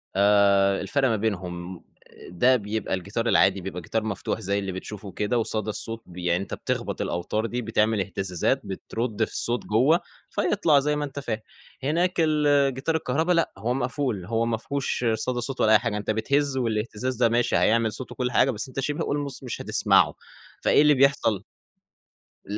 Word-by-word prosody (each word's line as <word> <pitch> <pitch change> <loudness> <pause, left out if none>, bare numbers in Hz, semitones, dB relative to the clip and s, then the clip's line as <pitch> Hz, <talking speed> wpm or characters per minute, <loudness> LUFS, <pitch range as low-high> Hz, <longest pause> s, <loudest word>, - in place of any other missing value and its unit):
آآ 100 -1 +4
الفرق 135 +7 +1
ما 110 - +2
بينهم 90 -4 -3
آآ، - - -18
ده 125 +9 +3
بيبقى 110 -1 -3
الجيتار 100 +6 -2
العادي، 95 -3 +4
بيبقى 90 -1 -6
جيتار 110 +7 -2
مفتوح 110 +1 -3
زي 100 -1 -1
اللي 95 -1 -3
بتشوفه 100 +2 -7
وكده 105 +5 -1
وصدى 110 -2 -1
الصوت 115 +2 -4
ب 90 - -14
يعني 90 +1 0
أنت - - -8
بتخبَط - - -3
الأوتار 105 +6 -2
دي، 120 +2 -3
بتعمل 110 -1 +1
إهتزازات، 95 -2 -1
بترُد 115 -1 -3
في - - -14
الصوت 120 +1 -2
جوَّه 130 +11 +3 0.3
فيطلَع، 185 -7 +2
زي 150 +2 0
ما 150 0 -1
أنت 140 0 -7
فاهم. 115 -6 -3 0.4
هناك 170 +6 +1
الجيتار 145 -2 +2
الكهربا 160 +3 0
لأ، 170 -1 +2
هو 115 +5 -1
مقفول، 125 -6 -2
هو 115 +2 0
ما 115 -1 0
فيهوش 140 0 -2
صدى 120 +2 -2
صوت 130 +2 -3
ولا 110 - +4
أي 110 - +7
حاجة، 115 -4 -2
أنت 105 +1 -2
بتهز 140 +5 0
والإهتزاز 115 +1 -2
ده 120 0 +3
ماشي، 120 +1 +1
هيعمل 115 0 +3
صوت 125 +4 -6
وكل 125 -1 -2
حاجة 135 - +3
بس 110 0 -5
أنت 130 - -6
شِبه 145 +2 -2
almost 145 -2 -3
مش 125 - -5
هتسمَعه، - - +3 0.5
فإيه - - +5
اللي 150 0 +6
بيحصَل؟ 130 -7 +2 1.0
ل - - -18
115 Hz, 180 wpm, -25 LUFS, 100-135 Hz, 1.0 s, أي